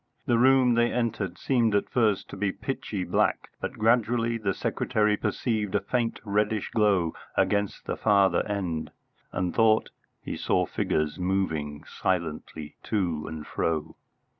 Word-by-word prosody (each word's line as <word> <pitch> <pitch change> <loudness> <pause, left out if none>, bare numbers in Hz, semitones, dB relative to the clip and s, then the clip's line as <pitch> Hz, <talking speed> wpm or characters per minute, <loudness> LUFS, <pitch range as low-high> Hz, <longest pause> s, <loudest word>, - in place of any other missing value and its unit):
The 120 -1 +2
room 130 -1 +5
they 120 0 +3
entered 110 -7 -2
seemed 115 -1 +2
at 100 - +1
first 110 -5 +1
to - - -6
be 100 0 0
pitchy 105 -5 -4
black, - - 0
but - - -4
gradually 115 +1 +2
the 100 -3 -1
secretary 105 -1 +1
perceived 105 -2 -1
a - - +4
faint 115 +3 -1
reddish 105 0 0
glow 100 -7 +2 0.2
against 100 -1 +1
the - - -2
farther 100 -4 +3
end, 90 -6 -2 0.4
and 90 -2 -1
thought 110 -1 +3 0.3
he - - -5
saw - - +1
figures 75 +1 -1
moving 80 -6 -1
silently 80 -4 -3
to 85 -8 -1
and 80 -2 -6
fro. 80 -1 -2
100 Hz, 140 wpm, -27 LUFS, 90-115 Hz, 0.4 s, room